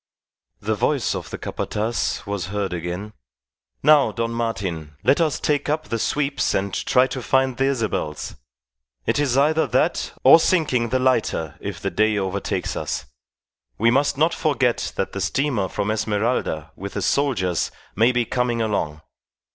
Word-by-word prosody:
The - - -1
voice - - +1
of - - -5
the - - -5
Capataz 110 -1 -2
was 100 -4 -3
heard 100 -2 -2
again: 90 +5 -5 0.7
"Now, 150 -1 +6
Don 115 0 -2
Martin, 95 -10 -3
let 140 +5 +4
us 155 -3 +1
take 145 -1 0
up 155 +1 -1
the 115 - -1
sweeps 140 +3 0
and 95 0 -1
try 125 +6 +3
to 130 0 -5
find 130 +1 +2
the 135 - +1
Isabels. 110 - -2 0.7
It - - +1
is 135 -3 +1
either 155 +3 +3
that - - 0
or 165 - +9
sinking 145 -10 +2
the 130 - +2
lighter 115 - 0
if - - -5
the - - -3
day 110 0 +2
overtakes 95 0 -2
us. - - -3 0.7
We 115 +2 +4
must 140 +2 +2
not 160 +3 +3
forget 140 -7 0
that 95 - -2
the 100 - -4
steamer 120 0 0
from 100 +3 -2
Esmeralda 105 -7 -1
with 100 +1 -7
the - - -2
soldiers 95 - +1 0.3
may 115 +3 +4
be 120 -1 +1
coming 125 0 0
along. 100 -9 -1
115 Hz, 160 wpm, -22 LUFS, 100-135 Hz, 0.7 s, or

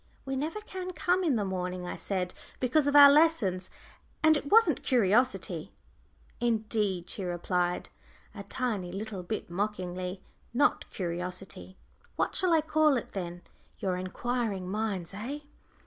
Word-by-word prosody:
"We 270 0 -2
never 315 +10 -3
can 370 -3 -6
come 355 +3 +1
in 305 -7 +2
the 210 -3 0
morning," 180 -1 -3
I - - -4
said, 185 -2 -2 0.3
"because 270 +4 +2
of 285 - +1
our 285 -1 +11
lessons. 280 - +3 0.5
And 315 0 +6
it 290 -1 -3
wasn't 455 +1 +5
curiosity." 245 +1 +1 0.7
"Indeed!" 215 -6 0
she 195 - -5
replied, 175 0 -1 0.4
a - - -7
tiny 215 -9 -3
little 200 0 -5
bit 180 0 -5
mockingly; 185 -1 -3 0.3
"not 280 - +2
curiosity. 180 +1 -5 0.4
What - - 0
shall 365 -2 +1
I 325 -1 +5
call 310 -2 +3
it, 235 - -5
then, 175 -2 -5 0.3
your 185 -2 -1
inquiring 195 +1 -2
minds, 200 -5 -2
eh?" 250 +9 -5
210 Hz, 140 wpm, -29 LUFS, 185-285 Hz, 0.7 s, our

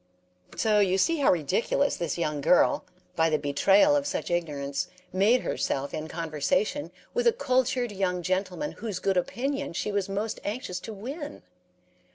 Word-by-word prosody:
"'" 90 0 -42
So 215 -1 +3
you 190 -2 +3
see 330 - +2
how 285 - +4
ridiculous 185 - +1
this 170 -1 -3
young 150 -4 -1
girl, 175 +5 +4 0.3
by 165 0 +3
the 155 - +2
betrayal 195 - +4
of 285 0 0
such 285 - -3
ignorance, 150 -3 -2 0.3
made 210 +7 +4
herself 140 +1 -2
in 155 0 -4
conversation 165 - -1 0.2
with 485 0 +1
a - - +7
cultured 255 - 0
young 185 -3 -1
gentleman 185 - -1
whose 210 -4 -5
good 195 +1 0
opinion 265 +7 -1
she 210 - -2
was 200 -1 -1
most 205 +3 -2
anxious 205 -4 -4
to 220 - -7
win. 285 - -7
195 Hz, 165 wpm, -27 LUFS, 170-255 Hz, 0.3 s, a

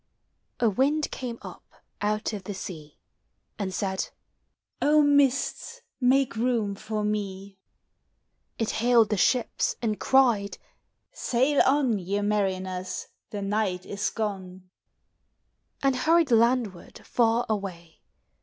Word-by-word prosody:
A 240 - +3
wind 280 +8 +1
came 245 -3 -5
up - - -13 0.2
out 210 +1 -1
of 200 -3 -6
the 205 - -5
sea. 155 -6 -8 0.6
And 195 -2 -2
said, 190 0 -2
kk - - -2 0.7
O 300 +1 +5
mists, 285 -2 +1 0.2
make 265 -1 +3
room 225 -3 0
for 215 +1 -4
mei 200 -2 -4 1.0
It 225 - -1
hailed 235 -1 +3
the 210 - +1
ships, 245 +5 +1
and 215 -3 -2
cried, 235 -7 +3 0.3
" - - -52 0.2
Sail 265 +4 +3
on, 265 -6 +2
Ye 195 +3 -2
mariners, 190 -3 -2 0.2
the 205 -1 -5
nighl 195 -3 -1
is 200 0 -2
gone! 190 -4 -5 1.1
And 270 -1 +3
hurried 320 +2 +3
landward 230 -5 +1
far 235 0 +2
away. 185 -6 -5
215 Hz, 120 wpm, -26 LUFS, 195-250 Hz, 1.1 s, O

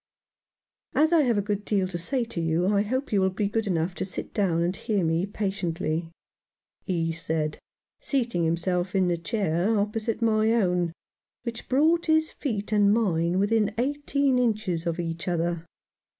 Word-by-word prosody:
"As 315 +3 +4
I 330 - +6
have 240 -6 +2
a 205 - +1
good 205 0 -2
deal 200 -3 +1
to 180 -2 -4
say 250 +9 0
to 180 -6 -4
you, 165 +2 +1
I 200 - +3
hope 255 +5 -2
you 200 - +4
will 190 - +3
be 200 +2 -1
good 225 +1 -1
enough 175 -1 0
to - - -3
sit 185 - -6
down 175 -6 +1
and 175 +2 0
hear 205 -2 -1
me 165 +4 +1
patiently," 175 -5 -2 0.8
he 165 -3 0
said, 160 -1 -2 0.4
seating 235 - 0
himself 175 +3 0
in 185 -2 +3
the 175 - +2
chair 195 +2 0
opposite 215 +2 -1
my 220 -1 +3
own, 180 -6 +1 0.5
which 235 -2 -6
brought 320 +6 +3
his 315 0 +3
feet 215 -7 -3
and 205 -1 +4
mine 180 -6 +1
within 210 +1 +2
eighteen 280 0 +1
inches 210 -8 0
of 170 0 -1
each 165 0 -4
other. 170 -1 -1
200 Hz, 170 wpm, -26 LUFS, 170-225 Hz, 0.8 s, I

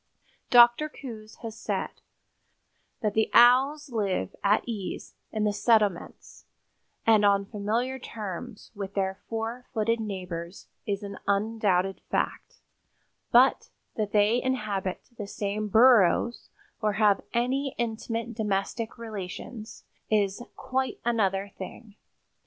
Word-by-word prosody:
Dr. 240 +5 +6
Coues 225 -7 -10
has 225 -1 -6
said - - -4 1.0
"that 210 -3 0
the 220 0 +2
Owls 270 +5 +5
live 200 - -1
at 205 +1 +3
ease 210 -5 -5 0.2
in 215 -1 -1
the 210 -1 +1
settlements 210 -4 0 0.6
and 220 -2 +5
on 200 -1 +4
familiar 230 +6 -2
terms 205 -4 -7
with 200 -2 -6
their 190 -1 -1
four 230 +2 -4
footed 230 +1 +1
neighbors 180 -4 -6 0.2
is 200 0 -2
an 200 0 -7
undoubted 200 -2 +1
fact; - - -2 0.7
but 250 +3 +5 0.3
that 210 -2 -2
they 215 +3 +3
inhabit 210 -8 -2
the 205 - -4
same 205 +1 -3
burrows 235 0 +4 0.3
or 210 -1 +1
have 210 -1 +3
any 260 +3 0
intimate 230 0 -3
domestic 215 +2 -2
relations 215 0 -7 0.3
is 205 -1 +1
quite 260 0 -2
another 200 -4 0
thing. 205 +3 -9
215 Hz, 115 wpm, -27 LUFS, 200-235 Hz, 1.0 s, Dr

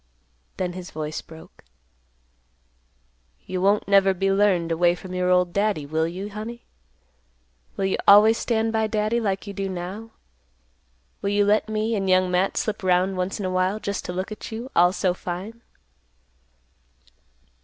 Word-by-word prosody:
Then 180 -2 -2
his 180 0 -8
voice 155 0 -5
broke; 160 0 -15 1.8
"You 185 -1 -3
won't 200 +2 +2
never 195 -1 +4
be 195 +1 0
learned 195 -4 +2
away 175 +1 +3
from 185 0 -10
your 180 0 0
old 180 -1 +2
Daddy, 200 -7 0
will 160 +2 0
you, 190 +5 -6
honey? 225 +3 -7 1.1
Will 195 - 0
you 190 - 0
always 215 +3 +7
stand 225 -1 0
by 220 0 +1
Daddy, 215 +2 0
like 195 -3 -2
you 200 - -7
do 195 0 -3
now? 190 +5 -6 1.1
Will 200 - -1
you 205 0 +2
let 210 +1 +2
me 215 +1 -1
and 195 -2 -1
Young 185 0 +3
Matt 180 +2 +1
slip 215 -1 -2
'round 185 +1 +2
once 185 +3 -3
in 200 - -3
a 185 - -1
while, 185 +3 0
just 200 -2 -4
to - - -4
look 185 +3 -4
at, 215 - -8
you, 235 +4 -6
all 175 +1 +5
so 185 -2 0
fine?" 185 +6 -7
195 Hz, 165 wpm, -24 LUFS, 180-210 Hz, 1.8 s, always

